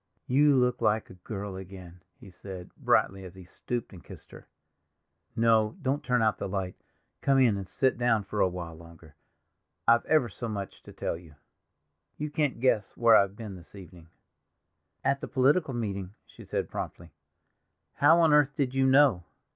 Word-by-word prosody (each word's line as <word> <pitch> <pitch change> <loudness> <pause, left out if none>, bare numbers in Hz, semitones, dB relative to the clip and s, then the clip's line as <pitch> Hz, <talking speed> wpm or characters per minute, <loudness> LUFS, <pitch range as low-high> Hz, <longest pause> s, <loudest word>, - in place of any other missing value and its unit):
"You 145 +2 +4
look 125 -1 +1
like 110 +1 0
a 90 -1 -16
girl 100 -1 -6
again," 90 -2 -11 0.2
he 95 - -13
said 90 -1 -10
brightly, 95 0 +1
as 90 0 -11
he 95 - -11
stooped 120 +6 -5
and 90 - -12
kissed - - -13
her. - - -13 0.9
"No, 110 -1 +2
don't 140 +3 -1
turn 125 -4 +1
out 110 -1 +1
the - - -4
light; 95 -1 -3 0.5
come 135 -1 +3
in 125 -6 +4
and 100 -2 -6
sit 130 -2 0
down 115 -4 +2
a 105 -2 +1
while 90 -2 -6
longer, 80 -2 -15 0.7
I've 115 0 +5
ever 155 -6 +3
so 120 +1 -6
much 100 -2 -6
to - - -11
tell - - -4
you. 80 -3 -16 0.8
You 150 0 -4
can't 145 -5 -1
guess 115 -5 0
where 115 -1 +6
I've 100 -1 +3
been 105 -3 -8
this 90 +2 -15
evening." 90 -3 -13 1.0
"At 135 +1 +1
the - - -5
political 135 +1 +2
meeting," 100 -4 -4
she - - -15
said - - -3
promptly. - - -6 0.8
"How 160 +5 +5
on 160 -2 +4
earth 145 -1 +4
did 130 -3 -1
you 135 0 +2
know?" 130 -9 +4
110 Hz, 175 wpm, -28 LUFS, 95-130 Hz, 1.0 s, where